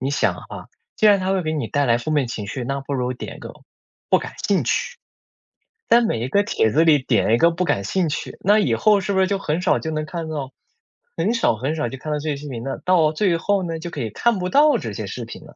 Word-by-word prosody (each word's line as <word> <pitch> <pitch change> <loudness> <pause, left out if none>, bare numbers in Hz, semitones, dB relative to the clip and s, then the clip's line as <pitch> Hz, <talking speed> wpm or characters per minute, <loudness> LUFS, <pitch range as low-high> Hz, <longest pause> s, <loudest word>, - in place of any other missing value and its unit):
你 135 +2 -2
想 140 - +1
啊， - - -10 0.3
既 215 - +3
然 205 -2 +5
它 185 +1 -1
会 190 -1 0
给 155 -1 -2
你 155 -2 -2
带 145 0 +1
来 115 -1 +4
负 155 - -5
面 145 -4 +1
情 110 -3 -5
绪， 125 +3 -4
那 135 +2 -2
不 135 +1 -6
如 125 -1 -1
点 125 - -8
个 - - -8 0.6
“不 - - +5
感 - - -7 0.2
兴 - - +2
趣”。 485 - -1 0.9
在 235 - +6
每 220 - 0
一 120 - -2
个 200 +10 +2
帖 205 - +1
子 155 +9 +3
里 155 -3 +5
点 115 -5 +1
一 115 - +5
个 170 - +5
“不 175 +2 -2
感 100 - 0
兴 175 - 0
趣”， 145 - -5
那 205 +3 +5
以 210 - +1
后 210 -1 +4
是 200 +1 -2
不 190 - +3
是 190 - +3
就 200 0 -1
很 160 -2 -2
少 185 - +2
就 160 - -5
能 155 0 -2
看 165 +1 -5
到 140 -4 -4 0.7
很 225 - +1
少 230 - +2
很 135 +8 -2
少 120 - -1
就 135 - -7
看 155 +4 -6
到 150 - -1
这 150 - -6
些 - - -2
视 150 +1 -8
频 120 -4 -6
呢？ 135 +1 -4
到 165 -4 +3
最 175 0 +1
后 200 +3 0
呢， 165 -2 -4
就 170 +2 -6
可 145 - -5
以 115 - -2
看 230 - +1
不 180 0 -2
到 295 +6 +5
这 - - -5
些 - - -5
视 - - -6
频 - - -10
了。 - - -16
155 Hz, 300 characters per minute, -21 LUFS, 135-190 Hz, 0.9 s, 在